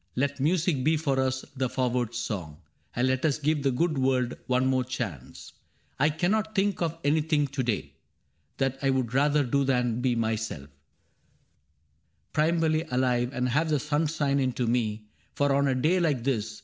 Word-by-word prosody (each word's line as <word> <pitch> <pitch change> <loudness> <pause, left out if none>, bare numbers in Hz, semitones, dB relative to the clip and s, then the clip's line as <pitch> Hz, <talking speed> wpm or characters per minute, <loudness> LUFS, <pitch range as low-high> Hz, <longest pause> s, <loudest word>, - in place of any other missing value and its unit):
Let 140 +2 -1
music 160 -1 +1
be 155 +3 +3
for 140 -4 0
us 130 0 -1
the 130 -1 -1
forward 125 -2 -1
song, 85 -8 -4 0.4
And 125 +2 +2
let 130 0 0
us 155 -4 +2
give 150 0 0
the 135 - +2
good 155 +3 0
world 130 -2 +1
one 130 0 +2
more 130 -1 +2
chance. 105 - -6 0.2
'* - - -39
I 150 +3 +4
cannot 210 +8 0
think 200 -1 +1
of 165 -1 -1
anything 150 0 +2
to 140 0 -2
day 115 -5 -2 0.6
That 135 -1 -1
I 135 - +1
would 130 -3 0
rather 145 +2 +3
do 140 +2 +1
than 125 -3 0
be 125 -1 +1
myself, 110 -11 -3 1.6
Primevally 160 0 +1
alive, 125 -1 +1
and 125 -2 -1
have 155 +6 +1
the 150 -2 +2
sun 150 +2 0
Shine 145 -2 0
into 130 -2 0
me; 110 -3 -1 0.3
for 145 -1 +2
on 140 0 +2
a 130 - +1
day 155 +8 +2
like 150 -8 +1
this. 110 -5 -2
135 Hz, 175 wpm, -27 LUFS, 125-150 Hz, 1.6 s, I